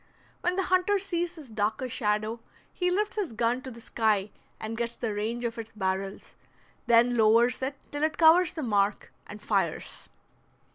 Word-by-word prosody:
When 355 +1 0
the 385 - +1
hunter 370 +2 +2
sees 350 -3 -2
this 295 -8 -12
darker 215 +4 -1
shadow 215 -1 -1 0.3
he 360 -1 0
lifts 415 +4 -1
his 380 - -2
gun 235 +3 0
to 265 - -7
the 235 -2 -11
sky 215 -3 0 0.3
and 220 +1 -4
gets 235 +1 -3
the 225 -3 -3
range 225 +4 -2
of 230 0 -3
its 225 0 -8
barrels, 195 -1 -3 0.5
then 240 +1 +5
lowers 230 +3 +4
it 270 +1 -3
till 290 - -4
it 310 -1 0
covers 335 +1 +6
the 315 - -4
mark, 205 -3 0
and 210 - -9
fires. - - -2
235 Hz, 175 wpm, -28 LUFS, 215-320 Hz, 0.5 s, covers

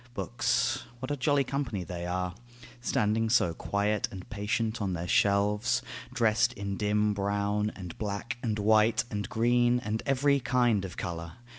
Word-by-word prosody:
Books; 90 - 0
what 130 +3 -5
a - - +1
jolly 145 +1 +2
company 130 -8 -3
they 85 0 -5
are, 90 0 -2 0.5
Standing 110 -1 +1
so 110 -8 +3
quiet 100 +4 0
and 95 -2 -9
patient 110 +2 -1
on 95 -2 -1
their 85 0 -3
shelves, 105 +6 +2 0.3
Dressed 110 0 +2
in 100 -3 -4
dim 105 +1 +1
brown, 100 +1 0
and 90 -4 -8
black, 105 +3 -3
and 110 -3 -1
white, 110 +2 +4
and 105 -2 -3
green 120 +1 +3
And 110 -2 -3
every 140 +1 +3
kind 120 -6 +2
of 90 - -8
colour. 85 -3 -5
105 Hz, 155 wpm, -29 LUFS, 100-120 Hz, 0.5 s, white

